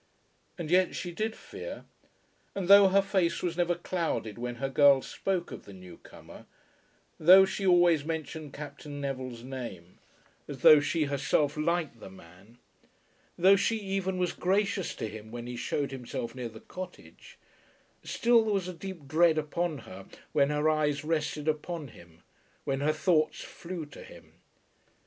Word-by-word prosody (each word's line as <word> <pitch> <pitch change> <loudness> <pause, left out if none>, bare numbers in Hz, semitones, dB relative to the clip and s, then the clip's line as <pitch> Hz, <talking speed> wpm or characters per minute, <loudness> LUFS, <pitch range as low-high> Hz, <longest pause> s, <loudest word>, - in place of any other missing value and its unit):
And 170 -3 -5
yet 185 0 +3
she 175 - -4
did 220 +5 -3
fear; - - -9 0.7
and 195 -3 -3
though 200 0 +9
her 195 +1 +3
face 190 -3 0
was 175 -2 -1
never 175 0 +1
clouded 165 - -3
when 120 0 -4
her 135 +3 -3
girl 135 0 +5
spoke 185 -3 -3
of - - -9
the 100 - -12
new 90 -2 -12
comer, - - -14 0.7
though 185 +4 +8
she 195 0 -3
always 175 -4 +5
mentioned 155 -1 -5
Captain 145 0 -8
Neville's 130 -4 -5
name 115 -10 -8 0.5
as - - -8
though 155 - +9
she 155 +2 0
herself 140 +1 0
liked 155 -5 -1
the 95 - -10
man, 95 +5 -17 0.8
though 190 +3 +6
she 210 +3 +1
even 195 -2 -2
was 180 -1 0
gracious 195 0 0
to - - -4
him 110 0 -9
when 120 +1 -7
he 125 0 -6
shewed 140 +3 -2
himself 125 -2 -5
near 125 -2 -5
the 110 0 -13
cottage, 185 0 -10 0.7
still 235 -1 +3
there 215 -1 0
was 190 -2 -1
a 185 - -5
deep 175 -4 -9
dread 160 +1 +4
upon 155 +1 -2
her 95 +1 -11 0.2
when 140 0 +3
her 150 +1 +1
eyes 150 -1 +1
rested 155 -1 -2
upon 155 -1 -2
him, 85 -5 -17 0.4
when 135 -1 -2
her 145 +2 +2
thoughts 155 0 +1
flew 170 -2 -7
to 145 - -13
him. - - -14
155 Hz, 165 wpm, -29 LUFS, 135-180 Hz, 0.8 s, though